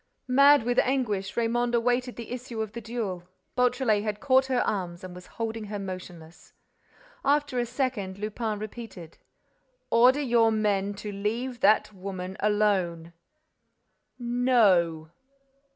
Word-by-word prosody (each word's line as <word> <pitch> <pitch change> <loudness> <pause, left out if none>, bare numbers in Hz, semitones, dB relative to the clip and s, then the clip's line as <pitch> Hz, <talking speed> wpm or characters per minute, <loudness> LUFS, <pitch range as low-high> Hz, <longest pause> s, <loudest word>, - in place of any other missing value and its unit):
Mad 280 +1 +6
with 245 +1 +1
anguish, 210 -8 -1
Raymonde 240 +1 +1
awaited 245 +1 0
the 235 -1 -8
issue 250 -2 -6
of 215 - -7
the 235 +1 -7
duel. 205 -6 -4 0.3
Beautrelet 250 -3 +2
had 210 -1 -3
caught 265 0 +3
her 255 -2 +1
arms 180 -4 -3
and 185 -1 -8
was 180 0 -12
holding 225 -1 -3
her 205 0 -5
motionless. 180 -4 -9 0.7
After 290 -3 +1
a 240 - -1
second, 235 -7 -2
Lupin 215 +1 -3
repeated: 215 -6 -9 0.7
"Order 250 +5 +5
your 235 -4 +3
men 205 -2 0
to 210 +1 -6
leave 230 +5 -3
that 215 0 +3
woman 185 -1 -6
alone." 190 -6 0 1.0
"No." 215 -11 +2
220 Hz, 130 wpm, -27 LUFS, 195-245 Hz, 1.0 s, Mad